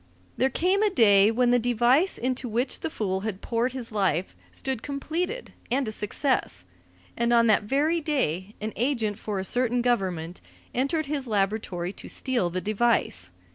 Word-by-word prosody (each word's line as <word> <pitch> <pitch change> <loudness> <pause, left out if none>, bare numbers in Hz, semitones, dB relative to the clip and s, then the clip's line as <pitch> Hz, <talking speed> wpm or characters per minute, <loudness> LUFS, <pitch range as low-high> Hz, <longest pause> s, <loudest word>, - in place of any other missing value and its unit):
There 265 - +2
came 370 - +1
a 430 - +4
day 205 - +5
when 240 +2 +2
the 245 - +4
device 245 - +2
into 255 0 -2
which 240 +5 -1
the - - -3
fool 195 -10 -2
had 200 -1 -4
poured 235 +2 0
his 250 -4 -5
life 190 -4 0 0.2
stood 265 -4 -4
completed 335 - -4 0.2
and 260 0 0
a - - -2
success. 215 - -2 0.5
And 235 0 +1
on 235 -1 +5
that 215 -2 +3
very 300 +8 +1
day 210 - -1
an 215 +1 -4
agent 225 -5 -1
for 210 -3 -4
a 190 - -2
certain 245 +2 +2
government 185 -8 -1 0.3
entered 280 +5 0
his 280 -2 -3
laboratory 195 -4 -1
to - - -10
steal 245 -9 0
the 185 +1 -3
device. 210 - 0
235 Hz, 170 wpm, -26 LUFS, 205-265 Hz, 0.5 s, day